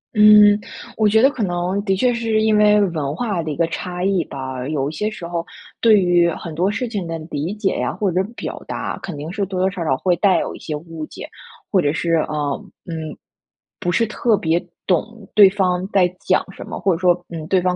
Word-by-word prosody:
嗯， 210 -1 +7 0.4
我 215 -2 +3
觉 220 +2 +4
得 270 - +7
可 255 - -6
能 180 +2 -1
的 195 -1 +2
确 245 +5 +2
是 225 -2 0
因 220 0 +3
为 210 0 +5
文 155 -8 -1
化 205 -4 -2
的 155 - -5
一 150 - -3
个 170 - +2
差 180 +2 -5
异 190 -2 +2
吧， 130 -1 -6
有 140 -2 -1
一 - - -8
些 210 +7 -1
时 180 -6 -8
候 170 -1 -3 0.4
对 220 -3 +6
于 175 -2 +3
很 165 -1 -6
多 180 +5 +1
事 245 +4 -2
情 200 -6 -4
的 165 - -3
理 150 +5 -2
解 200 -3 -1
呀， - - -1
或 200 -4 0
者 185 +2 +1
表 - - -6
达， - - -4
肯 180 -6 -6
定 150 +4 -6
是 200 +1 -2
多 185 -1 -4
多 190 +1 +2
少 180 -3 -4
少 135 -4 +1
会 180 +2 +1
带 190 +1 +3
有 - - -3
一 - - -10
些 155 - -5
误 165 +1 -8
解， - - -9 0.4
或 190 -3 +4
者 145 - +1
是， 165 +2 -1
呃， 150 -3 -1 0.2
嗯， 160 -3 -6 0.6
不 175 - -1
是 230 +6 +2
特 215 0 +1
别 165 +1 +1 0.3
懂 215 +4 -1
对 200 -2 +8
方 185 -2 0
在 185 -2 +4
讲 185 - +1
什 - - -9
么。 - - -6
或 195 - +2
者 165 - -3
说， 180 -1 +4 0.2
嗯， 160 -2 -6
对 190 0 +3
方 180 0 0
180 Hz, 250 characters per minute, -20 LUFS, 165-205 Hz, 0.6 s, 对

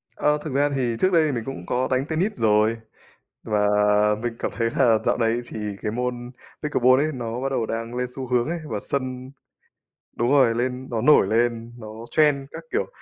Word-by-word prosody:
Ơ, 150 0 +2
thực 150 -4 -5
ra 145 +1 +2
thì 125 -3 0
trước 185 - +3
đây 165 -3 +4
thì 150 - 0
mình 120 -4 -3
cũng 135 - -7
có 125 +1 0
đánh 130 +1 +1
tennis 170 +7 0
rồi 110 0 +2 0.7
và 105 -1 +1 0.6
mình 120 -1 -2
cảm - - -2
thấy 115 -1 0
là 120 -4 +5
dạo - - +2
này 115 0 +1
thì 120 - -7 0.2
cái 105 - -2
môn 125 +1 -4 0.3
pickleball 130 -3 +3
ấy 155 +1 0
nó 120 -1 -4
bắt 135 - -1
đầu 125 -4 -1
đang 115 +2 -4
lên 125 0 -1
xu 130 -1 -5
hướng 125 0 +1
ấy, 170 0 -2
và 105 - -2
sân 130 +1 -3 0.9
đúng 120 +1 0
rồi, 130 -5 +4
lên 125 +2 -2
nó 115 -2 -1
nổi 130 -4 +5
lên, 115 +2 0
nó 110 - -9 0.2
trend 150 -2 +4
các 165 - -8
kiểu, - - 0
125 Hz, 210 wpm, -23 LUFS, 115-135 Hz, 0.9 s, là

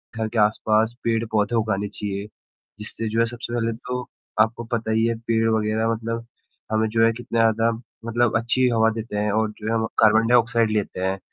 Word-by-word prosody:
घर 110 -1 -1
के 115 +1 -5
आसपास 110 +2 +2
पेड़-पौधे 115 -1 0
उगाने 105 -2 0
चाहिए, 100 0 -5 0.5
जिससे 110 +2 -4
जो 115 +2 -1
है 115 - +4
सबसे 120 0 -6
पहले 115 -1 0
तो 125 +2 -5 0.4
आपको 115 +2 +1
पता 115 -1 -1
ही 110 +1 +2
है 115 0 +1
पेड़ 115 -1 +2
वग़ैरह 110 0 +1
मतलब 115 +1 -4 0.5
हमें 110 0 +2
जो 115 +1 +3
है 115 - +4
कितना 120 -1 -3
ज़्यादा 115 0 +3 0.3
मतलब 115 0 +2
अच्छी 125 +3 +1
हवा 115 -1 +3
देते 110 -2 -5
हैं 105 0 0
और 110 +1 +1
जो 105 - -6
है 110 - 0
कार्बन 110 +1 +5
डाइऑक्साइड 115 -2 +3
लेते 105 -3 -2
हैं 95 +1 -1
115 Hz, 190 wpm, -23 LUFS, 110-115 Hz, 0.5 s, कार्बन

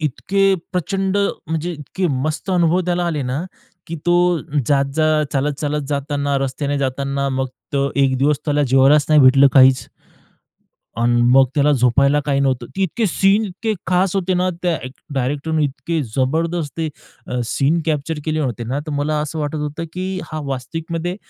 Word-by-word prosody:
इतके 195 +7 +1 0.2
प्रचंड 195 +2 -1 0.3
म्हणजे 160 +2 -2
इतके 165 +4 -3 0.2
मस्त 155 +5 -3
अनुभव 175 -1 +3
त्याला 175 0 0
आले 155 -4 -1
ना, 130 +4 -2 0.4
की 165 - -5
तो 175 - +4 0.5
जात-जात, 150 +2 +2
चालत-चालत 145 +1 -1
जाताना, 145 0 -1
रस्त्याने 140 +1 -2
जाताना, 140 +1 -1
मग 130 0 -1 0.2
तो 140 0 +1
एक 135 -1 +3
दिवस 145 +2 +2
त्याला 145 -1 +1
जेवायलाच 135 +3 +5
नाही 155 -1 +6
भेटलं 135 +1 +7
काहीच. 130 -1 +5 1.1
अन् 120 +1 +2
मग 135 +1 +7
त्याला 150 0 +3
झोपायला 140 +3 +3
काही 140 -1 +1
नव्हतं. 130 -3 0
ते 195 - 0
इतके 215 +5 0
सीन 195 +4 +2
इतके 215 +3 -3
खास 185 +1 +1
होते 185 -1 0
ना, 180 +1 +1
त्या 175 -2 +1
एक 130 - -7 0.2
डायरेक्टरने 145 +4 -1
इतके 155 +4 -2 0.2
जबरदस्त 160 +4 -1
अ, 150 -5 -6
सीन 140 +8 +1
कॅप्चर 155 0 -1
केले 155 -1 -1
होते 120 -4 -3
ना, 130 +5 -2
तर 155 - -4
मला 145 +1 -1
असं 155 +2 -4
वाटत 150 0 -3
होतं, 150 +2 -4
की 185 +1 -3
हा 155 0 -4
वास्तविकमध्ये 165 +6 -4
150 Hz, 160 wpm, -19 LUFS, 140-165 Hz, 1.1 s, भेटलं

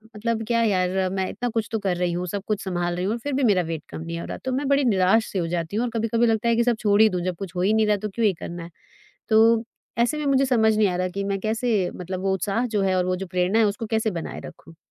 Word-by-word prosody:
मतलब 225 +1 -2
क्या 230 0 +2
यार 185 -2 +1
मैं 190 -1 -1
इतना 245 +4 -3
कुछ 225 -2 -2
तो 225 - -1
कर 190 -3 -1
रही 175 0 0
हूँ, 180 +1 -3
सब 200 +2 -4
कुछ 215 -1 -1
सँभाल 175 -2 -2
रही 180 +1 -2
हूँ 205 - 0
और 235 - -4
फिर 285 +4 -4
भी 270 +1 0
मेरा 205 -6 +4
वेट 160 -2 -4
कम - - -7
नहीं 170 +1 -5
हो - - -6
रहा, - - -6
तो 260 - -4
मैं 270 +2 -1
बड़ी 280 +1 +3
निराश-सी 200 -1 +2
हो 170 - -1
जाती 170 +2 -3
हूँ 230 - +1
और - - -2
कभी-कभी 230 +1 +1
लगता 225 +1 +1
है 230 - +3
कि 235 - +3
सब 240 -1 +2
छोड़ 205 -1 +3
ही 220 - +7
दूँ 180 -3 -2
जब 185 -1 -1
कुछ 190 -2 -7
हो 180 - -1
ही 200 +4 +3
नहीं 220 -1 +3
रहा 210 -1 +3
तो - - -8
क्यों 225 +3 -1
ये 205 - +3
करना 170 0 -6
है? 170 - -9 0.6
तो 225 +1 +5 0.3
ऐसे 240 +6 +2
में 300 - -3
मुझे 275 -1 +3
समझ 220 -4 +3
नहीं 210 -1 +3
आ 180 - -2
रहा 185 0 0
कि 195 +2 -4
मैं 195 0 -1
कैसे 220 -3 0
मतलब 185 +1 -5
वो 190 0 0
उत्साह 205 +5 -1
जो 215 -4 -1
है 190 -1 +1
और 180 - +2
वो 185 0 0
जो 190 +1 -5
प्रेरणा 180 +4 +1
है, 225 - +5
उसको 210 +2 -1
कैसे 220 0 0
बनाए 170 -3 -5
रखूँ? 165 - -12
205 Hz, 305 wpm, -24 LUFS, 185-225 Hz, 0.6 s, ही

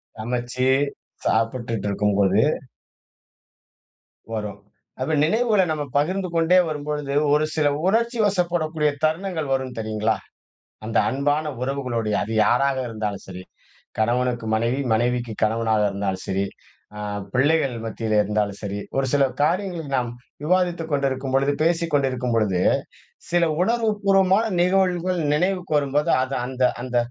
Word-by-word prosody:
சமைச்சு 120 +3 -2 0.6
சாப்பிட்டுட்டிருக்கும்போது 105 -4 +1 1.9
வரும். 105 -2 -4 0.4
அப்ப 135 +5 -1
நினைவுகள 215 +4 +3
நம்ம 150 -1 -1
பகிர்ந்து 185 +6 0
கொண்டே 165 +2 +4
வரும்பொழுது, 150 -2 -3 0.2
ஒரு 150 +1 +3
சில 155 -2 +2 0.2
உணர்ச்சிவசப்படக்கூடிய 180 -8 +1
தருணங்கள் 160 -2 -1
வரும் 130 -1 -2
தெரியுங்களா? 110 0 0 0.7
அந்த 110 - -1
அன்பான 145 +3 0 0.2
உறவுகளோடு 125 -4 -2
அது 110 - -3
யாராக 135 +3 +2
இருந்தாலும் 105 -3 -4
சரி. 90 -1 -8 0.5
கணவனுக்கு 120 +1 0
மனைவி, 115 +4 0
மனைவிக்கு 120 0 0
கணவனாக 110 0 +1
இருந்தாலும் 100 -1 -3
சரி, 95 +1 0 0.5
அ - - -7 0.3
பிள்ளைகள் 140 0 +2
மத்தியிலே 110 -1 -1
இருந்தாலும் 105 -1 -1
சரி, 100 0 -3 0.2
ஒரு 135 - +2
சில 140 -1 +4 0.2
காரியங்களை 175 +1 0
நாம் 120 -1 -1 0.3
விவாதித்துக் 175 -1 +1
கொண்டிருக்கும்பொழுது 135 0 +1
பேசிக்கொண்டிருக்கும் 145 -7 +1
பொழுது 100 -5 +1 0.7
சில 175 0 +3 0.2
உணர்வு 230 +2 +2
பூர்வமான 195 +2 +4 0.2
நிகழ்வுகள் 180 -1 +2
நினைவுக்கு 180 0 0
வரும்போது, 145 +1 0
அது 130 +1 -3
அந்த 130 0 -4 0.2
அந்த 125 -1 -3
135 Hz, 110 wpm, -23 LUFS, 115-165 Hz, 1.9 s, கொண்டே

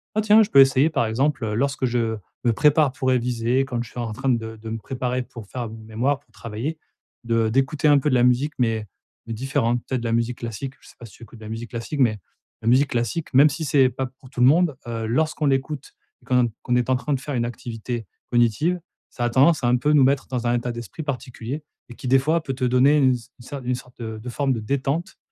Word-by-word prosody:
«Ah 215 - +3
tiens, 215 +1 +6
je 210 - -4
peux 135 - +8
essayer 135 +3 +5
par 135 - 0
exemple, 135 +4 0
heu, 105 -1 -2
lorsque 140 +3 -1
je 115 -2 0 0.3
me 120 - +4
prépare 150 +2 +3
pour 130 0 -1
réviser 125 +1 +1
quand 125 -3 -3
je 115 - -12
suis 125 - -8
en 115 -2 -3
train 135 +5 -2
de 115 -2 -1
de 110 +1 -8
me 115 - -3
préparer 125 +2 -3
pour 115 -3 -11
faire 120 +1 -5
mon 110 0 -10
mémoire, 120 +6 -1
pour 120 - -35
travailler, 115 +9 -5 0.5
de 115 -1 +2
d'écouter 135 +5 +1
un 145 -1 +6
peu 150 - 0
de 130 - +2
la 120 - +4
musique 125 +5 +2
mais 110 -3 0 0.4
mais 115 - -4
différente» 120 0 0
peut-être 130 -2 -1
de - - -6
la 115 - 0
musique 115 +1 0
classique, 120 +4 -5
je - - -17
sais - - -18
pas 120 - -9
si 100 - -17
tu 120 - -14
écoutes 115 - -13
de - - -12
la 105 - -7
musique 115 +1 -6
classique? 120 +5 -5
Mais 110 -5 +3 0.4
la 110 - -5
musique 130 +4 +4
classique, 120 +7 -2
même 140 +4 +7
si 160 +3 -4
c'est 135 -2 +4
pas 130 +1 -3
pour 130 0 -14
tout 130 - -9
le - - +7
monde, 155 0 +3
heu, 115 -1 -3
lorsqu'on 155 +5 0
l'écoute 135 +1 -1 0.3
et - - -24
qu'on 125 -1 +3
en - - +1 0.2
qu'on 125 - +1
est 125 0 +1
en - - +4
train 145 +3 -2
de 135 - 0
faire 145 +2 -5
une 120 - +1
activité 120 -1 -5 0.3
cognitive, 120 - +2 0.3
ça 120 - -5
a - - +1
tendance 140 +5 +4
à - - +3
un 125 +1 +4
peu 150 +5 +1
nous 145 -3 +6
mettre 135 +1 +2
dans 125 -2 -3
un 120 - +2
état 120 0 -2
d'esprit 120 +6 -7
particulier, 135 0 -5 0.3
et 120 - -10
qui 130 - -7
des 135 +2 +5
fois 160 +5 +1
peut 135 - -3
te 130 0 -5
donner 130 +4 +4
une 130 -2 +4
une - - 0 0.3
ce 135 +4 -8
une 125 0 0
sorte 125 0 -12
de 110 -1 -5
de 120 +3 -7
forme 135 +2 0
de 115 - -3
détente. 140 - -2
125 Hz, 265 wpm, -23 LUFS, 115-140 Hz, 0.5 s, peux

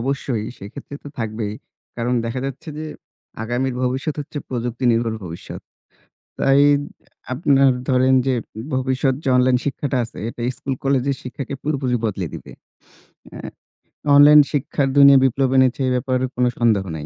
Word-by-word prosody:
অবশ্যই। 130 -3 -2
সেক্ষেত্রে 130 +8 -10
তো - - -7
থাকবেই। 110 -2 -3 0.4
কারণ 120 +1 -1
দেখা 115 +2 -3
যাচ্ছে 135 +3 -8
যে, 155 - -5 0.6
আগামীর 125 +3 -2
ভবিষ্যৎ 130 +4 -1
হচ্ছে 145 0 -6
প্রযুক্তি 125 0 -4
নির্ভর 115 -1 0
ভবিষ্যৎ। 85 0 -8 0.8
তাই, 135 +1 +4 0.7
আপনার 135 0 +3 0.2
ধরেন 130 0 +3
যে, 130 - +2 0.4
ভবিষ্যৎ 130 +1 0
যে - - -1
অনলাইন 125 0 +4
শিক্ষাটা 140 -1 -2
আছে, 115 - -12
এটা 120 - -9 0.2
স্কুল 135 -2 -3
কলেজের 135 0 +1
শিক্ষাকে 130 +2 -6
পুরোপুরি 135 -4 -1
বদলে 95 -4 -2
দিবে। - - -10 0.8
অ্যা - - -10 0.7
অনলাইন 150 +1 +9
শিক্ষার 140 -1 0
দুনিয়ায় 140 -1 +8
বিপ্লব 135 +1 +1
এনেছে, 130 0 +3
এই - - +1
ব্যাপারে 130 0 0
কোন 125 - +2
সন্দেহ 110 -5 +3
নাই। 75 - -7
130 Hz, 145 wpm, -20 LUFS, 120-140 Hz, 0.8 s, অনলাইন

